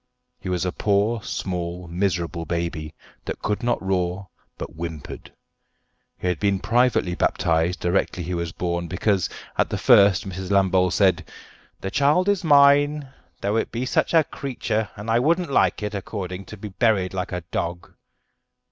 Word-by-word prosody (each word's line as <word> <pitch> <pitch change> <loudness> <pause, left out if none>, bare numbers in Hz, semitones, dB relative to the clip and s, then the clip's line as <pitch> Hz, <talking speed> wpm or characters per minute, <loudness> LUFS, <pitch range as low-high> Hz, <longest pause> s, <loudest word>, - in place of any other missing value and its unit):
He 95 - -6
was 90 -1 -1
a 90 - 0
poor, 105 +4 +1
small, 90 -2 -4
miserable 85 -2 -1
baby, 85 -2 -3 0.3
that - - -5
could 105 +2 -1
not 120 0 0
roar, 95 0 -1 0.3
but - - -7
whimpered. 80 -2 -7 0.9
He - - -8
had 90 -3 0
been 100 -1 +2
privately 115 -2 +2
baptised 85 +1 +1
directly 90 0 0
he 90 +2 -4
was 85 -1 -2
born, 85 0 -2
because, 95 +2 0 0.3
at - - +3
the - - -2
first, 100 -1 +5
Mrs. 95 0 -6
Lambole 95 -2 +3
said, 95 -2 +2 0.5
"The 95 - -4
child 150 +7 +3
is 200 -3 +1
mine, 145 -1 +5 0.3
though 100 +2 0
it - - -1
be 120 +3 -2
such 130 - +1
a 160 - +6
creetur, 115 -7 -3
and 105 +2 -8
I 115 +1 +3
wouldn't 165 +4 +1
like 120 - +2
it, 105 0 -3
according, 95 -2 -5
to 110 - -10
be 105 +1 -7
buried 100 -2 +1
like 95 -1 -3
a 90 - -3
dog." 85 +1 -4
95 Hz, 165 wpm, -23 LUFS, 90-115 Hz, 0.9 s, a